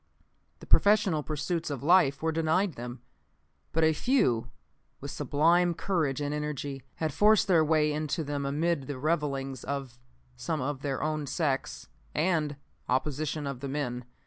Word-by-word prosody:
The - - -10
professional 205 -6 +4
pursuits 160 +3 -2
of 140 -3 -4
life 155 -4 +4
were 160 - +2
denied 165 +4 +1
them. 120 0 -8 0.7
But 160 - +1
a 160 0 +4
few, 130 - +1 0.5
with - - -6
sublime 170 +4 +2
courage 155 -8 0
and 145 0 -2
energy, 145 -2 -4
had 155 -3 -2
forced 210 0 +4
their 170 -4 +5
way 155 -1 +2
into 155 +1 -2
them 145 -1 -3
amid 145 0 0
the 145 - -4
revilings 135 -3 -1
of 135 -3 -5 0.4
some - - -3
of 135 0 -3
their 140 -2 -2
own 155 -2 -1
sex 140 -3 -2 0.3
and 155 -3 +1 0.3
opposition 145 +3 -1
of 140 -3 -4
the 140 +1 -5
men. 125 -3 -3
150 Hz, 150 wpm, -29 LUFS, 140-160 Hz, 0.7 s, their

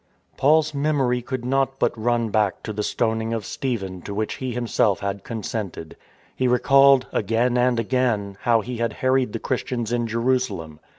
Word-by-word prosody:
Paujs 155 +2 +3
memory 140 -4 +1
could 125 0 -5
not 135 +1 0
but - - +1
run 115 0 0
back 105 -3 0
to 110 - -4
the 105 - -3
stoning 110 +1 -1
of 110 -3 -3
Stephen 95 -9 -4
to 100 - -6
which 110 +1 -2
he 130 -1 -4
himself 115 -4 +1
had 100 0 -3
consented. 105 -7 -5 0.4
He 130 - +1
recalled, 135 +1 +5
again 115 +4 +1
and 125 -1 +2
again, 115 -4 0
how 115 -2 +3
he 125 +2 -6
had 115 -1 -1
harried 130 -2 +1
the 115 - -3
Christians 120 -2 -2
in 120 -1 0
Jerusalem. 115 -9 -1
120 Hz, 170 wpm, -23 LUFS, 110-130 Hz, 0.4 s, recalled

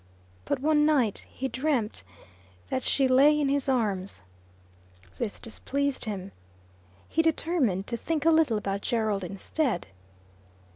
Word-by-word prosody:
But - - -1
one 295 +2 +3
night 275 -9 +2
he 265 - -4
dreamt 260 -5 -1 0.7
that 260 - -1
she 270 -2 +2
lay 280 +4 +5
in 285 -2 +1
his 280 -1 +1
arms. 200 - -1 1.0
This 215 -4 -3
displeased 280 +4 -2
him. 200 -3 -5 0.8
He 325 - +2
determined 315 - +1
to 235 - -3
think 315 +4 -2
a 330 - +6
little 315 -9 +3
about 200 -1 -2
Gerald 220 -5 0
instead. 200 - -2
260 Hz, 130 wpm, -27 LUFS, 210-295 Hz, 1.0 s, a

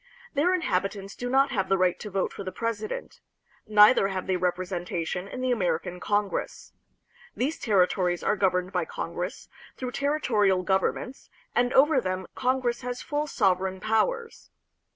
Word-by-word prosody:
Their 335 +6 +3
inhabitants 195 - -2
do 245 - -4
not 270 +2 +3
have 195 -6 -1
the 195 - +3
right 180 -1 +2
to 210 - -6
vote 195 -1 -1
for - - -7
the 185 - -5
presi 220 +1 -3
dent; - - -7 0.5
neither 210 0 +6
have 190 -2 -3
they 190 - 0
representation 180 0 -2
in 255 - -6
the 255 0 +1
American 180 -5 -1
Congress. 205 +1 -2 0.6
These 285 +6 -1
territories 180 -3 +2
are - - +2
governed 185 -2 +1
by 180 -3 0
Congress, 175 +4 -5 0.3
through 255 -1 -4
territorial 225 -10 +1
governments, 190 +7 -1 0.2
and 245 0 +2
over 275 0 +5
them 185 -2 -3
Congress 250 -1 0
has 250 0 -5
full 295 +1 -2
sovereign 190 -6 +1
powers. 455 - -1
200 Hz, 150 wpm, -27 LUFS, 185-250 Hz, 0.6 s, neither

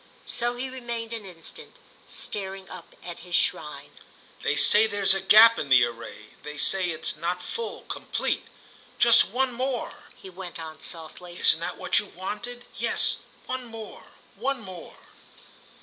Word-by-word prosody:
So 240 0 0
he 250 +2 -4
remained 235 -3 -6
an 220 -4 -6
instant, 170 - -12 0.3
staring 195 -1 -6
up - - -11
at - - -8
his - - -4
shrine. - - -1 0.5
"They - - 0
say 215 +1 +6
there's 200 -2 +5
a 195 - -1
gap 220 +4 +7
in 140 - -4
the 130 -2 +7
array—they 120 +5 -10
say 185 +5 +4
it's 160 -1 -2
not 170 +3 -3
full, 465 0 -5
complete. - - -3 0.5
Just 235 -1 +7
one 255 +3 -1
more," 255 0 -4
he - - -13
went 180 -1 -8
on, 160 -1 -9
softly—"isn't 175 +1 0
that 170 - -4
what - - +2
you 210 - -6
wanted? 240 +7 -6
Yes, - - +1 0.3
one 255 0 -4
more, 225 -2 -10 0.3
one 265 +6 -2
more." 185 -5 -10
200 Hz, 150 wpm, -26 LUFS, 175-240 Hz, 0.5 s, gap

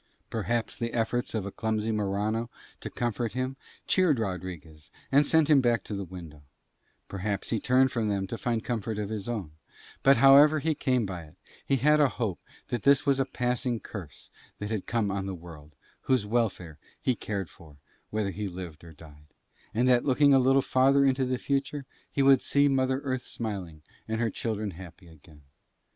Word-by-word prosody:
Perhaps 115 +2 -2
the 115 -1 -3
efforts 115 +1 -1
of 110 - -1
poor 100 - -5
clumsy 110 +1 -1
Morano 105 +2 -1 0.3
to - - -6
comfort 120 -1 -2
him 130 +1 -2 0.3
cheered 180 -7 +3
Rodriguez 85 -7 -6 0.2
and 140 +1 +5
sent 160 -2 +4
him 150 -3 +5
back 120 -4 +1
to - - -7
the 100 - -3
window, 85 -5 -10 0.7
perhaps 100 0 -3
he 115 - +1
turned 130 +3 +3
from 115 -3 -1
them 100 -1 -1
to 105 +4 -5
find 115 -2 -1
comfort 110 -2 -3
of 105 -1 -3
his 110 -1 -4
own; 105 -10 -4 0.5
but, 135 -1 +5
however 140 +4 +7
he 155 +2 0
came 130 -5 0
by 90 -4 -6
it, 75 +2 -18 0.3
he 135 - +3
had 150 +4 +4
a 145 -3 +5
hope 105 - -3 0.3
that 120 -3 -2
this 140 +3 +4
was 140 -1 +2
a 135 - +2
passing 125 -2 -1
curse 90 -11 -9 0.3
that 105 +1 -5
had 110 -4 -3
come 110 -4 0
on 100 0 -3
the 95 - -4
world, 80 -3 -13 0.3
whose 130 -5 +3
welfare 105 -8 -1 0.2
he 130 - +1
cared 100 -5 -4
for 75 -3 -17 0.3
whether 105 -2 -1
he 100 +3 -4
lived 90 -4 -8
or 85 -1 -12
died, 75 -1 -16 0.4
and 120 +3 +1
that 125 -1 +4
looking 140 +1 +4
a 135 - +6
little 135 +1 +4
farther 135 +2 +4
into 130 -1 +2
the 130 0 -1
future 140 +1 -2 0.3
he 140 - +1
would 135 -1 +6
see 140 0 +3
Mother 130 -1 +1
Earth 130 -3 -2
smiling 95 -12 -6 0.2
and 110 0 -2
her 115 -2 0
children 110 -2 -3
happy 90 +1 -12
again. 75 -2 -18
110 Hz, 190 wpm, -28 LUFS, 95-130 Hz, 0.7 s, however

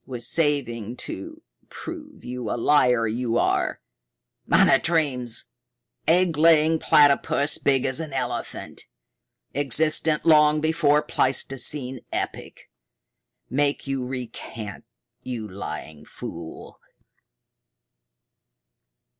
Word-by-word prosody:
Was 120 -3 -4
saving 125 -8 0
to 320 0 -5 0.3
prove 310 -3 -9
you 125 0 -5
the 110 - -2
liar 125 -3 +3
you 115 +1 -1
are. - - 0 0.7
Monotremes 135 -5 +2 0.6
egg 175 0 +3
laying 160 0 +4
platypus 145 0 +3
big 135 -2 +2
as 130 +2 0
an 160 -3 -5
elephant 135 - -5 0.7
existent 150 +3 +2
long 150 -1 +5
before 150 -2 +2
pleistocene 135 0 0
epoch - - -5 0.9
make 140 +3 0
you 135 -2 -2
recant, 115 -4 -7 0.4
you 120 -4 -5
lying 80 -5 -8
fool!" 80 +1 -9
135 Hz, 90 wpm, -24 LUFS, 120-155 Hz, 0.9 s, long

